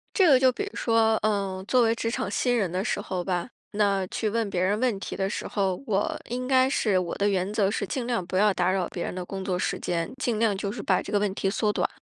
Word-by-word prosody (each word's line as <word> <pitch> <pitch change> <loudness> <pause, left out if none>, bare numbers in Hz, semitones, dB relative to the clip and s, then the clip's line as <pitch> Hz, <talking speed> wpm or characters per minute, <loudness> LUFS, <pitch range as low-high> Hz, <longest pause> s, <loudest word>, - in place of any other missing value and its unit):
这 380 -4 +5
个 270 -5 +6
就 260 0 +5
比 255 - -4
如 405 - -7
说， 225 -1 +3
呃， 195 -3 -1
作 255 +2 +4
为 225 0 +3
职 230 - -2
场 215 - -2
新 245 +3 +1
人 195 -6 0
的 185 +2 -1
时 230 - -1
候 185 -3 -3
吧， 180 +3 -2 0.2
那 200 -2 +1
去 215 +3 -2
问 225 -1 -1
别 180 -2 -1
人 200 +3 +1
问 245 -4 +1
题 - - -5
的 195 0 -1
时 - - -4
候， 190 -3 -1
我 205 -4 0
应 250 +1 -3
该 260 0 +4
是 210 -7 +1
我 180 -2 -2
的 200 +1 +2
原 190 0 0
则 205 -3 +2
是 205 - -2
尽 255 -4 -3
量 235 -7 -1
不 185 +2 -2
要 210 +1 +4
打 180 0 +1
扰 190 -2 0
别 175 - -4
人 - - -4
的 180 0 -4
工 190 +1 -6
作 180 -2 -1
时 - - -1
间， 170 -1 -2
尽 240 -4 -1
量 220 -3 +2
就 200 +1 -3
是 215 -1 -6
把 185 -2 +2
这 - - -8
个 205 - +2
问 200 -2 0
题 195 - 0
缩 210 +1 +1
短。 - - 0
205 Hz, 300 characters per minute, -26 LUFS, 190-230 Hz, 0.2 s, 个